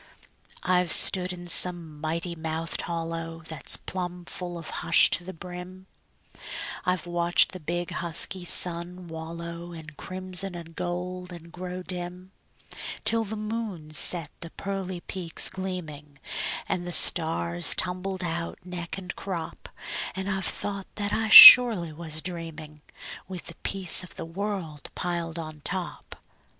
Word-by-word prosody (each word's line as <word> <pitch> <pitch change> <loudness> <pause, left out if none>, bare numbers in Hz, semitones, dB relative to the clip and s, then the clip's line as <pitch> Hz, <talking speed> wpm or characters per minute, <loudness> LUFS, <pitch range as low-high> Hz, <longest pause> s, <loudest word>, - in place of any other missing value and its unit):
I've 180 -2 +1
stood 185 -1 +8
in 175 -1 -9
some 170 -3 +1
mighty 165 +2 -3
mouthed 160 0 -3
hollow 165 -1 -6
That's 160 - -1
plumb 180 -1 -6
full 175 -1 -6
of 165 -2 -9
hush - - +5
to 180 - 0
the 185 - -8
brim; 180 +2 -11 1.0
I've 180 -1 -1
watched 175 0 +2
the 185 - -8
big, 175 +2 -4
husky 175 +2 0
sun 175 +1 +1
wallow 170 +1 -8
In 160 -2 -10
crimson 185 0 -3
and 165 -1 -11
gold, 180 +1 -5
and 170 -1 -11
grow 180 +1 -7
dim, 180 +1 -8 0.7
Till 230 0 +3
the 220 0 -6
moon 210 -8 -6
set 165 -1 +2
the 170 - -7
pearly 190 -1 -6
peaks 175 -3 -1
gleaming, 160 -7 -7 0.5
And 175 -2 -3
the 175 - -5
stars 85 - +4
tumbled 185 +1 -3
out, 170 0 -4
neck 180 -1 -7
and 185 -1 -8
crop; 170 -5 -7 0.5
And 190 +1 -5
I've 190 -2 -3
thought 200 -2 -4
that 205 -1 -3
I 220 0 -1
surely 215 -10 +10
was 155 -1 -1
dreaming, 160 -3 -8 0.5
With 185 -2 -9
the 170 - -11
peace 190 -2 +2
o' - - -10
the - - -8
world 170 -4 -6
piled 170 -2 -4
on 155 -2 -8
top. 180 -1 -6
175 Hz, 140 wpm, -25 LUFS, 165-185 Hz, 1.0 s, surely